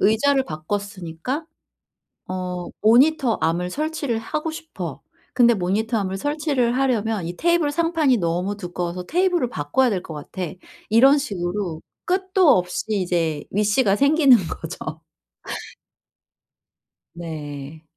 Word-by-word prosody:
'의자를 265 +6 +3
바꿨으니까 195 - -4 0.8
어 180 -1 -4 0.2
모니터 250 +2 +4
암을 175 +2 0
설치를 295 - -2
하고 305 +8 -3
싶어. 320 0 -7 0.3
근데 240 -2 +5
모니터 215 +5 0
암을 190 -1 -2
설치를 285 -2 0
하려면 225 -7 0
이 175 +1 -5
테이블 340 -3 +2
상판이 325 -4 +2
너무 180 +3 -1
두꺼워서 180 -1 -4
테이블을 350 - +1
바꿔야 160 - +1
될 190 -4 -1
것 160 - -9
같아.' 155 +3 -5 0.4
이런 265 +6 +6
식으로 180 - -3 0.2
끝도 370 -1 +2
없이 180 0 -3
이제 175 -7 0
위시가 205 +1 +2
생기는 280 -2 +6
거죠. 160 -1 -6 2.1
네. 155 -2 -7
210 Hz, 260 characters per minute, -22 LUFS, 175-280 Hz, 2.1 s, 이런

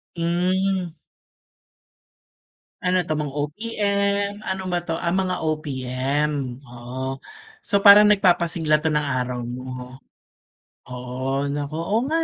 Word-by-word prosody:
Hmm. 180 +1 0 1.9
Ano 180 0 +2
'to, 155 -2 -2
mga 150 -2 -3
OPM, 200 +5 0
ano 190 0 -2
ba 175 - +1
'to? 165 - -2
Ah, 170 - 0
ang 185 - +1
mga 185 - -1
OPM. 140 -2 -2
Oo, 130 +1 -6 0.4
so 200 - 0
parang 205 +1 +9
nagpapasigla 175 -6 +3
‘to 155 - +2
ng 150 - +2 0.2
araw 125 -1 -2
mo. 125 +1 -7 0.9
Oo, 125 +2 -3
nako. 145 +1 -4
Oo 185 +7 0
nga 325 +1 +1
155 Hz, 120 wpm, -23 LUFS, 130-185 Hz, 1.9 s, parang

